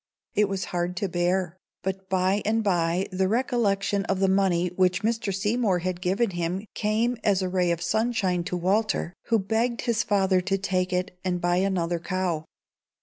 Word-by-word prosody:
It 210 -1 +2
was 195 -1 -2
hard 175 +1 -1
to 200 - 0
bear; 175 0 0 0.3
but 190 0 -4
by 190 +2 +2
and 225 +1 +1
by 175 -1 +1
the 185 0 +1
recollection 205 -4 +1
of 195 -1 -1
the 195 - +3
money 190 -2 +2
which 180 +1 +1
Mr. 225 -2 0
Seymour 210 +1 +1
had 180 0 -3
given 195 +4 +1
him 175 +3 -2
came 225 +3 0
as 200 -3 +2
a 185 - -1
ray 180 -1 +1
of 170 0 -1
sunshine 205 -2 +1
to 180 - -2
Walter, 190 0 0
who 230 - +3
begged 225 +4 0
his 235 -2 +1
father 190 -4 +2
to 195 +2 0
take 185 -1 -1
it 180 0 -2
and 180 -1 -1
buy 175 0 +1
another 175 -3 0
cow. 175 -3 -2
190 Hz, 180 wpm, -26 LUFS, 180-210 Hz, 0.3 s, the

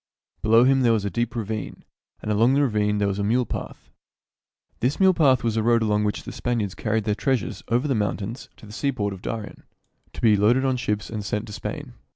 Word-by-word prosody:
Below 115 +2 +5
him 135 +1 +4
there 120 -2 +4
was 105 -3 0
a 100 - -2
deep 120 +1 -2
ravine, 110 -2 -4 0.4
and 105 - -2
along 115 +5 +3
the 145 - +3
ravine 105 -4 +1
there 100 -1 +1
was 100 0 -2
a - - 0
mule 120 +4 +2
path. - - -7 0.9
This 125 +5 0
mule 190 -1 +5
path 135 -8 +3
was 115 -2 +1
the 110 - 0
road 115 +1 +3
along 105 -1 +1
which 105 - -2
the - - -7
Span 120 0 -2
iards 100 -4 -2
carried 110 -1 -1
their 105 - 0
treasures 130 +4 -1
over 120 +6 +1
the 135 - +1
mountains 110 +2 -3
to - - -14
the 105 - -12
seaport 110 -6 -1
of 95 - -10
Darien, 110 -2 -6 0.5
to - - -8
be 110 -3 +5
loaded 115 +6 +3
on 130 -1 +2
ships 105 -5 -2
and 105 -2 -4
sent 105 +2 -2
to 105 - -10
Spain. - - -6
110 Hz, 230 wpm, -24 LUFS, 105-125 Hz, 0.9 s, Below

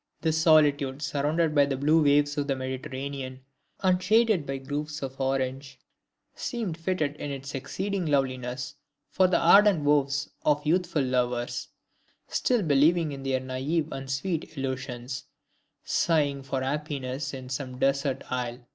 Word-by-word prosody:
The 160 - +2
solitude 150 -3 +3
surrounded 150 +3 0
by 145 -1 +4
the 135 -1 -1
blue 155 +4 +4
waves 145 0 +3
of 145 -2 -1
the 135 - +1
Mediterranean 130 0 -5 0.4
and 185 -1 +3
shaded 215 -4 +3
by 135 0 -2
groves 145 +2 -4
of 135 0 -5
orange, 135 0 -2 0.5
seemed 225 -9 -3
fitted 165 -3 -1
in 145 - -5
its 135 0 -6
exceeding 190 +7 -3
loveliness 130 -3 -1 0.4
for 185 - +4
the 180 - +3
ardent 195 -2 +6
vows 145 -1 +2 0.2
of 150 0 +2
youthful 170 -2 +1
lovers, 125 -1 -1 0.6
still 245 -5 +1
believing 155 +2 +3
in 135 -1 -6
their 135 -1 0
naive 140 +5 -2
and 135 0 -6
sweet 160 +3 -3
illusions, 130 -2 -4 0.6
sighing 145 -4 +1
for 135 -1 -3
happiness 140 -1 -3
in 130 -2 -8
"some 130 -1 -4
desert 135 0 0
isle." 125 -1 -2
140 Hz, 140 wpm, -27 LUFS, 130-155 Hz, 0.6 s, ardent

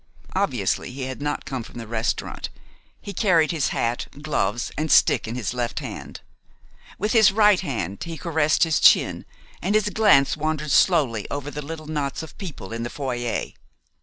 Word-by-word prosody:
Obviously, - - 0
he 130 +1 -6
had 130 0 -5
not 145 0 -2
come 135 -3 -4
from 115 - -11
the 115 - -6
restaurant. 110 0 -3 0.5
He 200 - -8
carried 170 -6 +3
his 160 -4 0
hat, 115 +1 -1
gloves, 120 -7 -1
and 155 0 -2
stick - - +4
in 115 - -4
his 120 -3 -3
left 120 -1 -3
hand. - - -8 0.8
With 210 +2 -1
his 220 -3 +6
right 210 -2 +5
hand 105 - -4
he 165 -1 -6
caressed 160 -3 +2
his 160 -3 +2
chin, - - +4 0.4
and 200 +4 0
his 210 -1 +2
glance 200 -12 +4
wandered 155 -1 -2
slowly 145 - +3
over 145 0 -4
the 150 - -5
little 155 +2 -7
knots 150 -1 -3
of 160 - -11
people 155 - -7
in 115 - -4
the 120 - -3
foyer. 120 -4 -3
145 Hz, 175 wpm, -23 LUFS, 120-165 Hz, 0.8 s, his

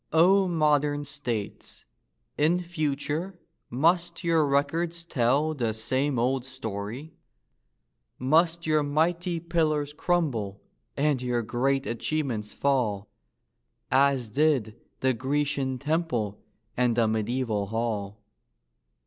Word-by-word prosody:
O 185 +4 +5
modern 150 -3 +2
states, 125 -7 -5 0.5
in 160 +4 +2
future 165 +1 -3 0.3
must 170 +7 +1
your 165 -3 +3
records 165 +5 0
tell 145 +1 +1
The 115 -7 -1
same 130 +5 0
old 125 +2 +1
story? 130 +2 -6 1.0
Must 165 +5 +2
your 155 -1 +3
mighty 165 +4 0
pillars 155 -3 0
crumble, 140 - -1 0.4
and 140 -2 +1
your 120 -2 0
great 135 +4 0
achievements 120 -3 -2
fall, 115 -8 0 0.8
As 135 -3 +3
did 130 -4 +1 0.3
the 130 0 +3
Grecian 135 +1 -1
temple 145 - -1 0.3
and 125 -2 +2
the 115 -2 +4
mediaeval 110 -1 -1
hall? 105 -2 -3
140 Hz, 100 wpm, -27 LUFS, 120-155 Hz, 1.0 s, O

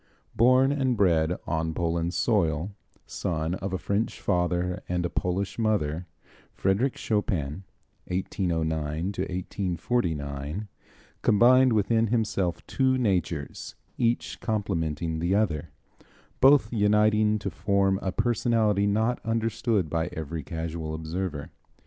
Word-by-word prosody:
Born 130 +4 +5
and 130 -4 0
bred 85 -3 +2
on 80 0 -2
Poland's 85 +1 -1
soil, 85 -5 +1 0.3
son 80 0 -2
of 95 +1 -4
a 95 - -1
French 100 +4 -2
father 90 0 0
and 90 -1 0
a - - -2
Polish 95 +5 -2
mother, 90 -7 0 0.5
Frédéric 105 +8 +1
Chopin 95 -7 -1 0.5
(1809 85 -3 -1 0.3
1849) 90 - -2 0.5
combined 125 +3 +5
within 110 +2 +2
himself 105 -6 -1
two 130 -1 +1
natures, 90 - -2 0.2
each 120 0 0
complementing 85 -7 -2
the 85 +4 +1
other, 85 -9 0 0.7
both 135 -4 +5
uniting 105 0 +3
to 100 -2 -4
form 100 -2 +1
a 95 - -1
personality 110 -2 +1
not 110 +4 0
understood 115 -3 0
by 80 +2 -1
every 80 +1 -4
casual 80 +1 -4
observer. 80 -1 -4
95 Hz, 110 wpm, -27 LUFS, 80-110 Hz, 0.7 s, Born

